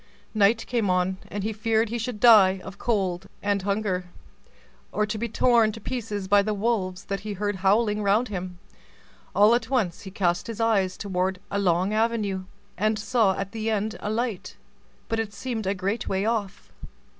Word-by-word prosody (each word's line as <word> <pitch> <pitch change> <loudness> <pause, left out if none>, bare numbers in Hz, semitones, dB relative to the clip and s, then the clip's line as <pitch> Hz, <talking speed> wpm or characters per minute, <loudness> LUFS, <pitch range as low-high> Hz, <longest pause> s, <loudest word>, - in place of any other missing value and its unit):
Night 220 +2 +3
came 230 -5 0
on, 180 +1 +1
and 205 -1 -5
he 220 +1 -2
feared 220 +1 +1
he 240 +1 -3
should 230 -1 -4
die 200 -5 +7
of 190 +1 -10
cold 190 -5 -1 0.2
and 200 -1 +1
hunger, 200 -2 -1 0.9
or 210 - +1
be 220 +2 -3
torn 230 -1 +3
to 225 - -8
pieces 210 -4 -4
by 205 +1 +5
the 210 +1 -1
wolves 195 -3 -1
that 195 0 -3
he 210 +1 -5
heard 205 0 -2
howling 210 +3 +2
round 210 +5 +2
him. 180 -3 -5 0.8
All 210 +3 +6
at 235 -1 0
once, 215 -11 0
he 190 - -8
cast 180 -1 0
his 230 -1 -6
eyes 200 -5 +1
toward 190 -1 -1
a 200 - 0
long 185 +1 +1
avenue, 215 -4 0 0.3
and 215 +1 +2
saw 215 -3 +2
at 195 0 -4
the 225 0 -3
end 215 0 -1
a 205 - -4
light, 225 -3 -3 0.5
but 225 - -1
it 215 -2 -3
seemed 220 0 -4
a 195 - +1
great 200 +4 -2
way 190 +1 0
off. 215 -4 -2
205 Hz, 180 wpm, -25 LUFS, 190-225 Hz, 0.9 s, die